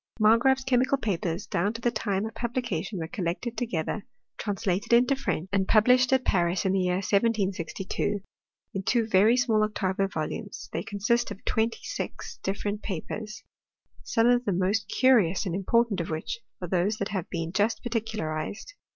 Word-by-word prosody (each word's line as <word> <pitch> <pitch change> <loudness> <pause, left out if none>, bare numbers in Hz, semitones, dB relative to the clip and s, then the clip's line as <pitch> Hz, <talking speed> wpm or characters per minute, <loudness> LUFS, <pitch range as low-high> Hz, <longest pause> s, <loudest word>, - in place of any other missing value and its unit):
Margraaf's 240 +5 +4
chemical 260 +1 +2
papers, 185 -6 -2
down 200 +5 0
to 230 - -7
the 240 - +2
time 200 -2 -1
of 225 - -6
publication, 235 -6 -3
were 160 -2 -3
collected 185 +7 -3
together, 215 -3 -2 0.4
translated 200 0 -1
into 250 +4 +5
French 265 - -2
and 190 -1 +2
published 250 +4 +5
at 260 -1 +3
Paris 175 0 +1
in 190 - +3
the 195 - +2
year 180 -1 +1
1762^ 200 -1 0 0.5
in 195 - -2
two 230 +4 +2
very 220 +3 +4
small 225 -4 +3
octavo 195 -2 0
volumes, 190 +4 -5
they - - -1
consist 235 +4 0
of 195 - -9
twenty 225 +1 0
six - - -5
different 205 +2 -2
papers: 210 +3 -5 0.6
some 225 - +1
of 245 0 +4
the 200 - +1
most 190 +4 +1
curious 215 -8 +3
and 180 - -2
important 200 +1 +1
of 170 - -5
which 160 +7 -3 0.2
are - - -2
those 185 +4 +1
that 200 - -2
have 190 -4 -3
been 165 -1 -3
just 205 +4 +1
particularized. 220 - -3
205 Hz, 165 wpm, -27 LUFS, 185-230 Hz, 0.6 s, into